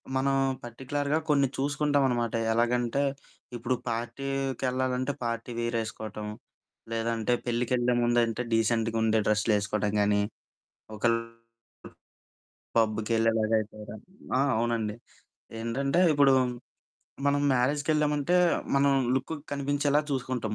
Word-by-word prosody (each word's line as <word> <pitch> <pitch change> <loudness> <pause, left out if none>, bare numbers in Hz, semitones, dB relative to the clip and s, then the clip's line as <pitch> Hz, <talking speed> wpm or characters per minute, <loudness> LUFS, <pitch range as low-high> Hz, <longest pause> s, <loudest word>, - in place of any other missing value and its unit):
మనం 135 +1 +2 0.3
పర్టిక్యులర్‌గా 140 +5 -2
కొన్ని 140 -2 +4
చూసుకుంటావనమాట. 135 -4 +1 0.2
ఎలాగంటే, 120 +3 +1 0.5
ఇప్పుడు 120 +2 -1
పార్టీకెళ్ళాలంటే 130 +1 -2
పార్టీ 115 +1 -3
వేర్ 120 0 -1
ఏసుకోవటం. 110 -1 -6 0.6
లేదంటే 115 0 0
పెళ్ళికెళ్ళే 120 +1 +1
ముందంటే 120 0 +1
డీసెంట్‌గా 115 0 +1
ఉండే 110 0 +3
డ్రెస్లేసుకోడం 105 -1 +1
కాని 105 0 +3 0.7
ఒకెళ 115 +2 +2 1.6
పబ్బుకెళ్ళేలాగా 110 0 +2
అయితెగ 110 0 -8 0.5
ఆ! - - +4 0.2
అవునండి 115 -2 -1 0.7
ఏంటంటే 135 +8 0
ఇప్పుడు 140 -2 +5 0.9
మనం 145 0 +3
మ్యారేజ్‌కెళ్ళామంటే 150 +4 +1 0.4
మనం 140 0 +4 0.2
లుక్ 135 +5 -3 0.2
కనిపించేలా 145 +1 +1
చూసుకుంటాం 125 -4 -2
120 Hz, 90 wpm, -28 LUFS, 115-135 Hz, 1.6 s, ఇప్పుడు